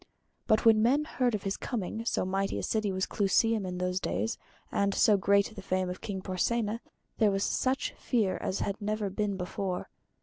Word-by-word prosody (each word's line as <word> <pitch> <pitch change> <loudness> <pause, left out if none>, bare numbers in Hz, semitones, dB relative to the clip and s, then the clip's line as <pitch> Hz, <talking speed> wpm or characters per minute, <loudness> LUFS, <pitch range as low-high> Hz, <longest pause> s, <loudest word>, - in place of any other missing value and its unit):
But 215 +1 +3
when 220 -1 +7
men 265 +7 +3
heard 250 -6 0
of 205 - -4
his 195 0 -2
coming, 225 -2 -3
so - - 0
mighty 195 +1 -1
a - - -3
city 215 -2 0
was 190 0 0
Clusium 210 +1 +2
in 180 0 -4
those 180 0 0
days, 225 +3 -2 0.3
and 200 0 +1
so 210 - +5
great 200 +2 +3
the 195 - -7
fame 185 -1 -1
of 180 - -8
King 190 -3 -4
Porsenna, 215 +4 0 0.4
there 215 -3 +5
was 195 0 0
such 260 +1 0
fear 215 -6 0
as 190 - -2
had 200 +2 -3
never 210 -1 -1
been 200 0 -1
before. 180 0 -3
200 Hz, 195 wpm, -30 LUFS, 190-220 Hz, 0.4 s, when